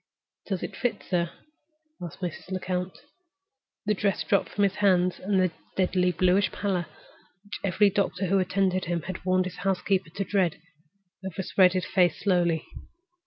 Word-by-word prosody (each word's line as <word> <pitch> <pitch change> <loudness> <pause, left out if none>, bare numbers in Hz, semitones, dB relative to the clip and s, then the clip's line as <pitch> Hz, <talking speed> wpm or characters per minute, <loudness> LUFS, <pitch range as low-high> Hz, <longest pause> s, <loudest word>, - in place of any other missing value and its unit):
"Does 190 -4 -2
it - - -5
fit, 245 -3 -2
sir?" 170 -2 +1 0.7
asked 175 +1 -8
Mrs. 180 0 -5
Lecount. 180 0 -3 0.8
The 210 - +2
dress 200 -1 0
dropped 200 - +1
from 205 - 0
his 195 -1 +1
hands, 185 -3 +3
and 195 0 +1
the 185 -2 +2 0.2
deadly 180 -1 +2
bluish 185 +3 +2
pallor—which 180 +1 -6
every 200 +1 +3
doctor 195 -1 0
who 195 +2 +2
attended 185 0 +1
him 170 -1 -2
had 185 -1 -6
warned 185 0 +2
his 185 - -6
housekeeper 190 -1 0
to 195 - -1
dread—overspread 180 +1 -1
his 185 -2 -1
face 180 -4 +2
slowly. 175 -4 +1
185 Hz, 145 wpm, -27 LUFS, 180-195 Hz, 0.8 s, hands